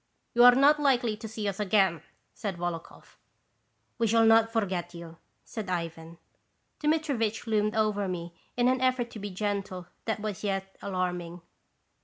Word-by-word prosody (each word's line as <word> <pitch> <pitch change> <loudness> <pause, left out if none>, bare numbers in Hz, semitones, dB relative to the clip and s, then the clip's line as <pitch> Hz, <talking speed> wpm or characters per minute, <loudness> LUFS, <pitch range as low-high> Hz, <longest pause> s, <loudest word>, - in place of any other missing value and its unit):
" - - -48
You 240 - +5
are 245 0 +9
not 290 +3 +5
likely 250 -6 +2
to 220 +1 -7
see 215 -1 -4
us 200 0 -3
again," 190 -5 +2 0.3
said 200 -5 -4
Volokhoff. 170 -1 -6 0.4
" - - -46
We 230 - +2
shall 225 +1 +4
not 225 0 +5
forget 185 -6 -2
you," 165 -1 -10 0.3
said 215 -4 -6
Ivan. 165 -1 -4 0.6
Dmitirivich 285 -9 0
loomed 215 -1 +1
over 210 -2 +1
me 170 -2 -5 0.2
in 245 0 +3
an 255 0 +2
effort 255 -2 +1
to 220 - -8
be 205 0 -5
gentle 195 -2 -3 0.2
that 220 -1 -1
was 210 -2 -5
yet 195 -1 -2
alarming. 180 -2 -3
210 Hz, 165 wpm, -28 LUFS, 180-230 Hz, 0.6 s, are